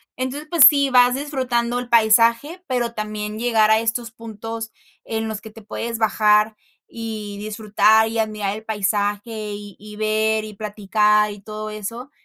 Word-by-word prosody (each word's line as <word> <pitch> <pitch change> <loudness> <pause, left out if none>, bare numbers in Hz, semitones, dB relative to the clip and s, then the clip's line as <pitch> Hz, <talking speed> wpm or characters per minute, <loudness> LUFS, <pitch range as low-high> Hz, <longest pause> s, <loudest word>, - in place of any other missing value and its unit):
Entonces, 270 +4 -4
pues, 330 -4 +6
sí, 280 -2 +1
vas 250 0 +5
disfrutando 250 -4 -1
el 245 -1 -7
paisaje, 230 +9 +3
pero 240 -2 -1
también 215 -1 -5
llegar 225 -2 +3
a 220 - +5
estos 230 +1 -2
puntos 225 0 -7 0.3
en 225 0 -3
los 215 -1 -5
que 220 - -10
te 220 0 -14
puedes 230 +2 -5
bajar 215 -1 +3 0.3
y 215 -3 -6
disfrutar 215 +1 +2
y 225 - -3
admirar 215 -2 -2
el 215 - -9
paisaje, 205 -1 -1 0.3
y 205 -1 -10
y 210 0 -11
ver 215 0 0
y 215 0 -8
platicar 210 0 +1
y 205 - -10
todo 215 +1 -7
eso. 230 +6 -7
220 Hz, 160 wpm, -21 LUFS, 210-235 Hz, 0.3 s, pues